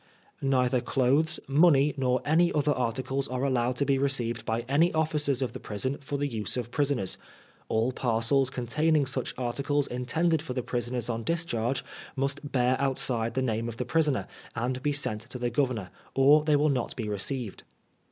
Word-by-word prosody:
Neither 130 -2 +2
clothes, 135 +6 +2
money, 145 0 +5
nor 130 -2 0
any 170 +3 +3
other 150 0 +2
articles, 130 +2 -2
are 130 +1 -3
allowed 125 -2 +1
to 140 - 0
be 135 -1 +2
received 125 -4 0
by 115 +1 0
any 140 +8 +2
Officers 150 -4 +1
of 120 - -3
the 130 - -6
Prison 130 +6 -3
for 140 +1 -3
the 145 - -1
use 110 -2 -3
of 120 -1 -4
Prisoners; 140 -10 -1 0.5
all 110 +3 +1
parcels 125 +2 +1
containing 145 +5 +1
such 130 -1 -3
articles 140 +3 0
intended 150 +7 0
for 125 -2 -4
Prisoners 120 0 -2
on 115 -1 -3
discharge 135 -6 -1 0.3
must 140 +2 -2
b^ 125 0 +2
outside 125 -4 0
the 130 - +1
name 115 -1 -1
of 115 - -8
the 125 - -2
Prisoner, 150 0 +1 0.3
and 125 +2 -2
be 145 - +1
sent 125 -7 -1
to 125 - -6
the 120 -1 -2
Governor, 120 -7 -1 0.2
or 145 +3 +6
they 150 -1 +3
will 150 +1 +3
not 130 -4 -1
be 115 -4 -4
re 105 -1 -2
ceived. 115 +1 -3
130 Hz, 180 wpm, -28 LUFS, 120-145 Hz, 0.5 s, or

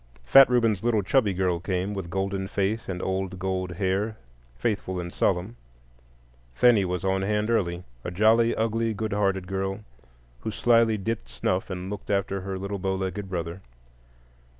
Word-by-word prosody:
Fat 135 - +8
Reuben's 115 -5 +2
little 115 -3 +2
chubby 110 +1 +2
girl 90 -2 0
came, 95 +2 -2
with 95 -4 -5
golden 95 +1 -2
face 100 +3 -1
and 90 -1 -3
old 95 0 -2
gold 95 -1 -2
hair, 100 +4 -1 0.4
faithful 95 - -2
and 85 0 -6
solemn. 95 +5 0 1.0
'Thenie 115 - +5
was 90 0 -2
on 95 0 +1
hand 105 +3 0
early,—a 85 - -2
jolly, 110 +5 +4
ugly, 115 0 0
good 110 0 -2
hearted 95 -2 +1
girl, 95 +1 -3 0.6
who 110 - -4
slyly 115 +1 +3
dipped 110 +3 -3
snuff 90 +2 -1
and 95 +1 -5
looked 105 -1 -7
after 100 -1 0
her 95 0 -4
little 100 +1 -4
bow 95 0 -1
legged 95 +1 -4
brother. 85 0 -4
95 Hz, 155 wpm, -26 LUFS, 95-110 Hz, 1.0 s, Fat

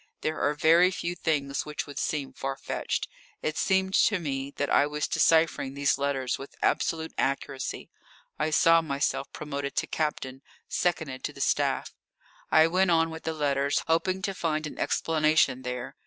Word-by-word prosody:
There 155 0 -2
are 150 - +1
very 165 +4 +5
few 175 -2 -3
things 140 -5 -1
which 150 0 -4
would 145 - -7
seem 145 -3 -2
far 135 0 -4
fetched. - - -3 0.4
It 155 - -1
seemed 190 0 +1
to 205 - +4
me 140 -5 -3
that 145 -1 -1
I 145 - +4
was 150 0 -2
deciphering 160 -4 +2
these 140 -1 +1
letters 135 -3 -1
with 135 - -10
absolute 160 0 0
accuracy. 135 -1 -2 0.5
I 155 - +1
saw 165 +2 +5
myself 140 -3 -2
promoted 140 -2 -5
to - - +1
captain, 135 -4 -3 0.3
seconded 160 -7 -1
to - - -4
the - - -13
staff. - - 0 0.6
I 160 0 +6
went 185 +3 +2
on 165 -1 +3
with 160 0 -9
the 160 - -1
letters, 140 -2 +1
hoping 185 +4 0
to 195 - -1
find 155 -4 -1
an 150 - -8
explanation 155 -4 +2
there. 125 -1 -5
150 Hz, 170 wpm, -27 LUFS, 140-165 Hz, 0.6 s, I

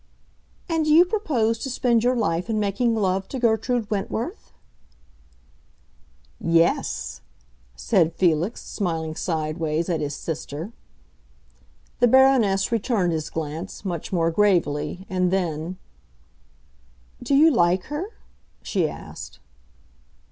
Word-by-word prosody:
"And 325 -3 0
do 305 - +2
you 335 +4 +7
propose 255 - 0
to 270 - -4
spend 240 -2 +1
your 250 +1 +2
life 180 -4 -1
in 215 -1 0
making 210 +3 +1
love 195 -2 0
to 270 - -5
Gertrude 235 -1 +1
Wentworth?" 225 - -3 1.9
"Yes!" 165 - +1 0.5
said 65 - +1
Felix, 175 +4 +1
smiling 160 -5 -3
sidewise 160 0 -2
at 165 -3 0
his 145 -1 -3
sister. 160 +4 -5 1.3
The 245 - +5
Baroness 240 -7 +4
returned 215 -5 +1
his 155 -1 -3
glance, 160 +5 -6
much 175 -4 -4
more 165 -3 +1
gravely; 180 -2 +1
and 185 -1 +1
then, 175 -1 -2 1.4
"Do 260 +3 +1
you 315 +3 +6
like 180 - +2
her?" 295 +7 -4 0.6
she 175 -7 0
asked. - - -9
190 Hz, 110 wpm, -24 LUFS, 165-235 Hz, 1.9 s, you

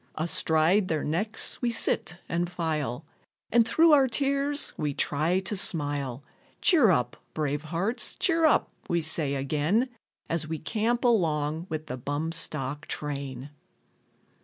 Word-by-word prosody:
Astride 165 +4 +2
their 155 -3 -1
necks, 205 +9 -1
we 245 - +1
sit 175 -6 0
and 170 0 -1
file, 155 -6 -3 0.5
And 230 0 +4
through 330 +4 +5
our 275 -3 +6
tears, 280 +3 0
we 145 -2 -2
try 160 +6 +1
to 190 +2 -2
smile. 145 -7 0 0.4
Cheer 300 - +5
up, 125 -9 +1 0.2
brave 150 0 -2
hearts, 190 +10 -1
cheer 330 -3 +1
up, 310 - +3 0.2
we 170 - +2
say 155 -3 +1
again, 150 - 0 0.4
As 165 -2 -1
we 160 0 -3
camp 225 - -1
along 160 -8 +1
with 155 -1 -4
the 130 -4 -5
bum 145 +5 -3
stock 150 -3 -2
train. 140 -2 -5
160 Hz, 135 wpm, -27 LUFS, 145-215 Hz, 0.5 s, our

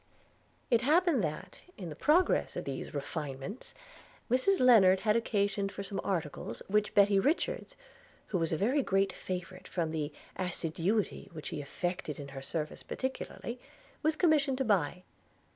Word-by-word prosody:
It 235 -1 +5
happened 310 - +3
that, 155 -1 -4 0.2
in 180 -4 -6
the 150 - -7
progress 325 - +3
of - - -4
these 135 - -4
refinements, 145 - -5 0.6
Mrs 260 +11 +3
Lennard 195 -7 +7
had 215 -1 +3
occasion 200 -3 +1
for 200 0 -6
some 195 0 -4
articles 150 - -3
which 210 +1 +1
Betty 200 -1 +6
Richards 355 - 0 0.5
(who 185 - 0
was 165 -1 0
a 160 - +1
very 250 - +2
great 195 -4 +1
favourite, 185 0 -6
from 165 -3 -1
the 155 -2 -2 0.2
assiduity 180 +3 -1
which 155 -2 -6
she 150 - -4
affected 175 +1 -3
in 140 -1 -7
her 135 -1 -7
service 155 +2 -4
particularly) 260 -2 -4 0.4
was 315 0 +2
commissioned 300 -6 +3
to 265 - 0
buy. 180 -4 +1
195 Hz, 150 wpm, -31 LUFS, 165-245 Hz, 0.6 s, Lennard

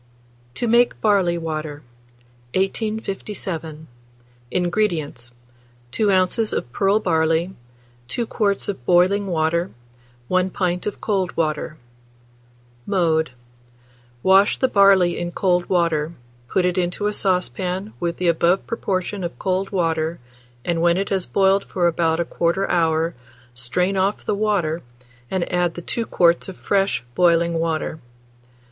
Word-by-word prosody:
TO 240 - -1
MAKE 240 +2 +3
BARLEY 195 -5 +2
WATER. 155 -3 -5 0.7
1857. 195 -6 -3 0.6
INGREDIENTS. 170 - -1 0.6
2 205 +8 +1
oz. 190 +4 +2
of 120 - -3
pearl 200 +2 +2
barley, 165 -1 +1 0.5
2 235 - -2
quarts 205 -3 0
of 190 -12 -4
boiling 185 +3 +3
water, 170 +1 0 0.6
1 185 0 +1
pint 180 0 -2
of 205 - -4
cold 195 -4 -1
water. 155 -1 -1 1.1
Mode. 165 -5 +2 0.9
Wash 195 +2 +5
the 260 - +2
barley 195 -6 +4
in 175 0 -3
cold 180 -1 +1
water; 165 -3 +1 0.4
put 185 - +1
it 180 0 +1
into 180 +3 -2
a 210 - +1
saucepan 185 - -1
with 170 -1 -2
the 180 - -1
above 170 +3 +2
proportion 195 -3 -2
of 170 -8 -5
cold 190 +4 -1
water, 165 -3 0 0.5
and 170 -1 0
when 170 +1 +3
it 195 +1 -1
has 190 -2 -1
boiled 195 0 +3
for 180 - -1
about 165 -1 +2
1/4 170 +3 0
hour, 165 -1 +1 0.4
strain 180 +12 0
off 195 +2 0
the - - 0
water, 200 -6 0 0.5
and 185 -2 -1
add 175 -1 +1
the 175 - -6
2 230 +5 -3
quarts 170 +1 +3
of 185 - -9
fresh 195 -9 0
boiling 170 +1 +3
water. 160 -1 -2
180 Hz, 130 wpm, -22 LUFS, 165-195 Hz, 1.1 s, Wash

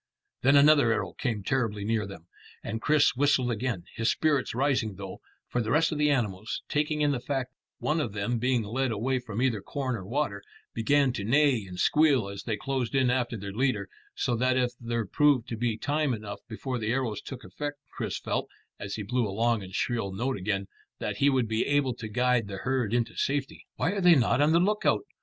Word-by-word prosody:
Then 135 +3 +5
another 145 -4 +6
arrow 115 - -1
came 115 -7 -2
terribly 110 -4 -1
near 110 -2 0
them, 100 -4 -10 0.4
and 110 +1 -4
Chris 150 -3 +3
whistled 130 -2 +2
again, 115 -5 -2
his 115 - +1
spirits 145 -7 +1
rising 130 -6 +1
though, 95 -1 -8 0.3
for 125 - -1
the 110 - -3
rest 160 +7 +3
of 150 - -3
the 150 0 +3
animals, 110 -6 -1
taking 150 0 0
in 145 -1 +3
the 135 - -1
fact 130 0 -3
of - - -27
one 155 +1 +1
of 115 -8 -3
them 110 +4 -1
being 125 -1 +1
led 130 +5 -1
away 125 +5 0
from 115 -1 -3
either 115 -6 +1
corn 130 0 -3
or 100 - -6
water, 105 -1 -2 0.3
began 135 +3 +2
to 105 - -4
neigh 130 -1 +3
and 90 -1 -8
squeal 140 -8 +3
as 100 0 -8
they 110 -2 -1
closed 135 -2 -2
in 130 -2 +3
after 125 -2 -1
their 100 -1 -6
leader, 130 +4 0 0.3
so 120 - 0
that 130 +2 +2
if 125 -1 +1
there 115 -1 -2
proved 140 +1 +3
to 115 - -3
be 115 -1 -1
time 145 0 0
enough 105 -2 -7
before 125 +3 -4
the 110 0 -1
arrows 120 -5 -1
took 130 -1 -8
effect, 145 -1 -5
Chris - - -3
felt, - - -2 0.3
as 100 0 -5
he 110 - -4
blew 120 +2 0
a - - -5
long 115 +2 +1
and 95 0 -8
shrill 115 -5 -1
note 120 +8 -1
again, 100 0 -2 0.3
that - - -3
he 140 - +4
would 130 -4 +1
be 110 +1 0
able 145 -3 +2
to 115 -2 -7
guide 125 0 +1
the 100 -1 -6
herd 125 -2 -1
into 120 -1 0
safety. 140 -1 -2
"Why 170 - 0
are 200 -1 -2
they 175 -2 +7
not 125 -1 +3
on 150 +2 +4
the 165 - +5
lookout?" 210 - +1
125 Hz, 220 wpm, -28 LUFS, 110-140 Hz, 0.4 s, they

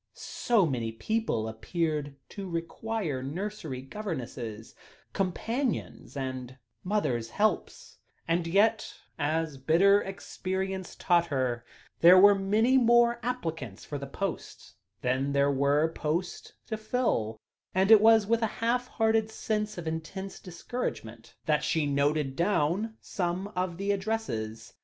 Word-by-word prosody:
So 230 -7 +1
many 120 -7 -2
people 160 - -1
appeared 150 +5 -2
to 195 -2 -7
require 170 -2 -3
nursery 155 -2 -5
governesses, 125 - -6 0.4
companions, 225 - -2
and 130 -1 -5 0.3
mothers' 130 - 0
helps; 215 - -1 0.3
and 165 0 +1
yet, 210 +5 +2 0.2
as 155 -1 -1
bitter 190 +9 +5
experience 190 -1 -4
taught 170 -2 +2
her, 130 -5 -1 0.4
there 175 +2 +8
were 205 +2 +8
many 215 +7 +3
more 235 0 +4
applicants 165 - -4
for 145 - -5
the 140 - -6
posts 195 +6 -5 0.3
than 130 +2 0
there 140 0 +3
were 140 +3 +2
posts 170 +4 -3
to 220 - -3
fill; 215 - -1 0.4
and 190 +3 +3
it 220 -2 +9
was 220 -1 +6
with 230 +2 +1
a 225 - +2
half 245 +2 0
hearted 220 -1 +1
sense 215 -1 -2
of 175 - -5
intense 175 +5 -5
discouragement 170 - -6
that 150 -1 +2
she 160 -2 +1
noted 140 0 +1
down 195 +5 0
some 180 +1 -2
of 180 -2 -2
the 200 +2 0
addresses. 120 - -3
175 Hz, 125 wpm, -29 LUFS, 140-210 Hz, 0.4 s, it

